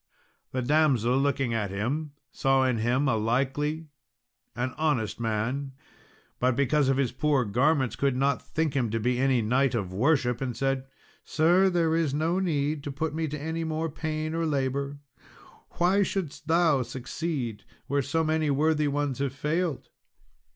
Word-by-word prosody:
The 130 -1 -2
damsel 130 -4 +3
looking 135 -3 0
at 105 -3 -1
him, 135 +10 -3 0.2
saw 135 0 +2
in 125 -3 +1
him 125 +5 +1
a 130 - +2
likely 135 +7 -1 0.7
an 130 +2 -2
honest 145 -10 0
man, 120 +5 -2 0.7
but 125 0 +2
because 140 +1 +2
of 135 - +2
his 135 -4 +1
poor 135 0 +1
garments 130 +4 +1
could 140 -2 +1
not 135 +1 +1
think 155 -3 -2
him 125 -4 +1
to 115 +2 -1
be 125 +3 0
any 130 -3 +2
knight 130 +3 +2
of 95 -5 -3
worship, 125 +2 +1
and 125 -3 -3
said, 135 -1 -1 0.4
"Sir, 175 +5 +3
there 165 -3 +1
is 160 -4 0
no 165 +4 +1
need 150 -5 -1
to 145 - -3
put 155 +3 -3
me 160 0 -1
to 150 0 -5
any 160 +3 -3
more 160 0 -2
pain 155 0 -3
or 165 0 0
labour; 140 0 -1 0.8
why 185 +4 +3
shouldst 190 -6 -3
thou 160 -4 +3
succeed 125 -2 -4 0.2
where 140 +1 0
so 145 +5 0
many 155 -1 +1
worthy 150 +2 +2
ones 145 -2 -1
have 140 -2 -1
failed?" 155 +2 -2
140 Hz, 165 wpm, -27 LUFS, 125-155 Hz, 0.8 s, damsel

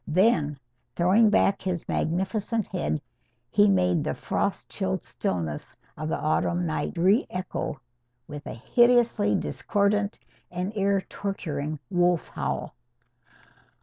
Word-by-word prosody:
Then, 160 -4 +3 0.4
throwing 195 +6 +5
back 200 -1 +3
his 180 -3 -3
magnificent 200 +6 -1
head, 75 +1 -2 0.5
he 105 - +5
made 90 -2 +3
the - - -2
frost - - -2
chilled - - -2
stillnesses 80 -5 -3 0.2
of 155 +1 -4
the - - 0
autumn 170 +3 0
night 160 +2 -2
re 195 - +4
echo 180 -6 -4 0.5
with 145 0 -8
a - - -5
hideously 235 - +3
discordant 205 0 0 0.3
and 180 +4 -4
ear 200 -1 +2
torturing 155 -8 -4
wolf 175 -2 +2
howl. - - -3
180 Hz, 115 wpm, -26 LUFS, 150-205 Hz, 0.5 s, throwing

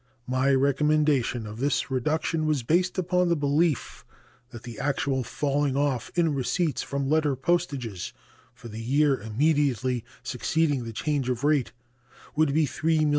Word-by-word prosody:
My 130 +2 +1
recommendation 140 -3 +2
of 105 +1 -8
this 140 +1 0
reduction 155 +4 0
was 150 -5 +1
based 180 +9 +1
upon 180 0 +1
the 170 - +3
belief 145 0 0 0.5
that 120 -2 -10
the 120 -3 -8
actual 135 -2 0
falling 140 +2 -1
off 135 -4 0
in 165 -3 +2
receipts 150 +4 0
from 140 -1 -3
letter 150 -1 +2
postages 135 - -2 0.4
for - - -11
the 110 0 -7
year 140 +2 +2
immediately 130 0 +1 0.2
succeeding 135 +1 0
the 115 - -5
change 140 +3 -1
of 125 +1 -2
rate 145 -4 +2 0.6
would 155 -1 +3
be 155 +2 +3
$3,000,000. 155 +2 +1
140 Hz, 145 wpm, -26 LUFS, 125-155 Hz, 0.6 s, the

